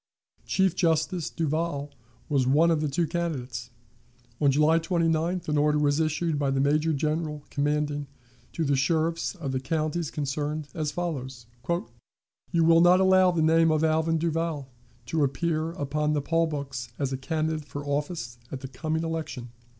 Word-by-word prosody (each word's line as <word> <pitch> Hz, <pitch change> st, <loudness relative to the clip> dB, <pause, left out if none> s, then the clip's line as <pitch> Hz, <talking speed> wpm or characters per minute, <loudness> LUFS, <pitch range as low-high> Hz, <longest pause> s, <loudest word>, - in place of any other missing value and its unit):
Chief 190 Hz, -2 st, +2 dB
Justice 165 Hz, 0 st, +1 dB
Duvall 155 Hz, -2 st, -2 dB, 0.4 s
was 135 Hz, -4 st, +1 dB
one 155 Hz, +5 st, +4 dB
of 160 Hz, -2 st, +1 dB
the 155 Hz, -, 0 dB
two 155 Hz, +5 st, 0 dB
candidates. 140 Hz, -8 st, -3 dB, 0.7 s
On 145 Hz, -, +5 dB
July 150 Hz, +4 st, +4 dB
29th 165 Hz, 0 st, 0 dB
an 150 Hz, -1 st, +1 dB
order 150 Hz, 0 st, +3 dB
was 145 Hz, 0 st, +2 dB
issued 155 Hz, 0 st, 0 dB
by 140 Hz, -1 st, +1 dB
the 135 Hz, 0 st, +1 dB
Major 150 Hz, +3 st, +2 dB
General, 150 Hz, 0 st, -1 dB
commanding, 145 Hz, 0 st, -1 dB, 0.5 s
to 165 Hz, -, -1 dB
the 140 Hz, -1 st, +2 dB
sheriffs 165 Hz, +6 st, 0 dB
of 150 Hz, -8 st, -4 dB
the 130 Hz, -, -1 dB
counties 155 Hz, +3 st, -1 dB
concerned, 150 Hz, +1 st, -3 dB
as 155 Hz, -2 st, -2 dB
follows: 135 Hz, -8 st, -4 dB, 1.0 s
"You 170 Hz, -2 st, +2 dB
will 165 Hz, 0 st, +6 dB
not 175 Hz, +1 st, +6 dB
allow 190 Hz, -1 st, +5 dB
the 170 Hz, -3 st, +1 dB
name 165 Hz, +1 st, +4 dB
of 155 Hz, 0 st, +2 dB
Alvin 160 Hz, +1 st, +2 dB
Duvall 165 Hz, -3 st, -2 dB, 0.4 s
to 155 Hz, +5 st, 0 dB
appear 155 Hz, +4 st, 0 dB
upon 150 Hz, -1 st, -1 dB
the 145 Hz, -, +1 dB
poll 165 Hz, +2 st, +2 dB
books 135 Hz, -5 st, -5 dB
as 135 Hz, -1 st, -1 dB
a -, -, 0 dB
candidate 155 Hz, +2 st, -2 dB
for 145 Hz, 0 st, -7 dB
office 145 Hz, -4 st, -3 dB
at 130 Hz, -, -5 dB
the 135 Hz, -, -5 dB
coming 155 Hz, +5 st, -2 dB
election." 155 Hz, -7 st, -4 dB
155 Hz, 165 wpm, -27 LUFS, 145-165 Hz, 1.0 s, will